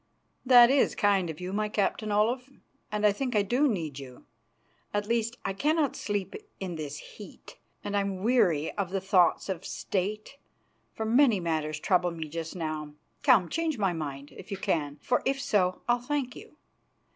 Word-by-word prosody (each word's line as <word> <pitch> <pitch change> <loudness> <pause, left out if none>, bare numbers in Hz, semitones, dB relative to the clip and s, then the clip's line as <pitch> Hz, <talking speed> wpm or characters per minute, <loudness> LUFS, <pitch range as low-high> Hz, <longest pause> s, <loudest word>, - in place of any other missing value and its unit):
"That 245 -1 +8
is 275 -1 +3
kind 195 -4 +2
of 155 - -6
you, 180 +1 -5
my 210 +1 0
Captain 210 +1 -1
Olaf, 240 +5 +1 0.4
and 210 0 0
I 210 - +6
think 250 +3 -3
I 205 - +4
do 250 +9 +2
need 160 - -2
you. 130 -2 -11 0.7
At 205 0 0
least, 230 +2 -1
I - - -1
cannot 300 +6 +1
sleep 205 -2 -3 0.3
in 185 -2 -4
this 150 -2 -5
heat, 205 +6 -12 0.2
and 205 - -3
I 200 - +3
am 195 -1 -4
weary 180 - +2
of 195 -3 -1
the 195 +1 -1
thoughts 185 -3 +3
of 190 -3 -4
State, 210 +8 -3 0.5
for 220 - -4
many 235 -2 +4
matters 155 -3 -2
trouble 180 0 +2
me 165 -2 -6
just 165 +2 -5
now. 155 -3 -4 0.3
Come, 250 - +5
change 320 - -1
my 195 -4 +1
mind, 145 -3 -6
if - - -11
you 200 - -4
can, 145 -6 -1
for 245 - +1
if 270 0 0
so 200 -9 +1
I'll 240 0 +2
thank 270 -1 -2
you. 300 - -13
200 Hz, 180 wpm, -28 LUFS, 170-240 Hz, 0.7 s, That